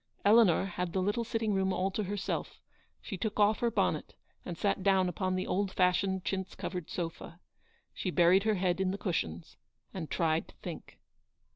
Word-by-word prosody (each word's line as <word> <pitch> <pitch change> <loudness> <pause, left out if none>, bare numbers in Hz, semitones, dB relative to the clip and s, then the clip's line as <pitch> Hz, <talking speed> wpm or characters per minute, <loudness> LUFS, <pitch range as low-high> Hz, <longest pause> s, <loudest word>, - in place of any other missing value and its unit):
Eleanor 205 -4 +6
had 180 -2 -3
the 190 - +1
little 205 +5 0
sitting 225 -2 -1
room 190 0 +1
all 190 +1 0
to 210 +2 -2
her 205 +2 -3
self; 195 - -3 0.4
she 195 - -5
took 215 +3 -3
off 210 +1 +4
her 240 - +2
bonnet 230 - -1 0.3
and 175 -2 -6
sat 200 +1 0
down 190 -1 +3
upon 185 +1 -1
the 185 - -1
old 195 0 0
fashioned 185 0 +1
chintz 190 -1 -3
covered 180 -3 -5
sofa. 170 0 -5 0.5
She 185 - -3
buried 180 +2 +5
her 215 0 +1
head 180 0 0
in 190 - +1
the 195 - -2
cushions 85 - -3 0.4
and 170 -5 -5
tried 160 -1 +1
to - - -17
think. - - -9
190 Hz, 185 wpm, -31 LUFS, 180-205 Hz, 0.5 s, Eleanor